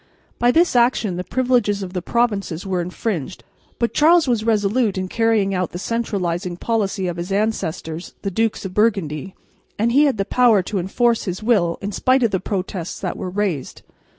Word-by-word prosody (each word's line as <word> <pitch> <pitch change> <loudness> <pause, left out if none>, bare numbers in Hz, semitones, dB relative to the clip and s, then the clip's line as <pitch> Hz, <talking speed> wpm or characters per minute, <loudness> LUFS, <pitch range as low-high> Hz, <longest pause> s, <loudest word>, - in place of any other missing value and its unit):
By 240 - +4
this 335 +3 +3
action 235 -6 +2
the 180 - -3
privileges 240 -4 +1
of 185 -1 -7
the 180 - -2
provinces 200 -6 -1
were 185 -2 -1
infringed, 180 - -4 0.3
but 235 - -1
Charles 325 +1 +5
was 235 -4 +1
resolute 215 -1 +1
in 185 0 -2
carrying 220 -2 +1
out 185 -1 -2
the - - -4
centralising 180 -5 -2
policy 200 -3 -1
of 175 -1 -3
his 175 +3 -5
ancestors, 185 -5 -2
the 195 - -2
Dukes 225 +1 -1
of 185 - -5
Burgundy, 190 -6 0 0.4
and 230 +3 +1
he 285 +5 +5
had 275 -6 +1
the 195 - 0
power 230 -4 +4
to 195 +1 -2
enforce 230 +6 +1
his 185 +1 -4
will 195 -8 +2
in 205 - -2
spite 255 +5 +2
of 230 - +2
the 190 - 0
protests 185 -2 -4
that - - -3
were 185 - -5
raised. 185 -7 -3
200 Hz, 185 wpm, -21 LUFS, 180-230 Hz, 0.4 s, Charles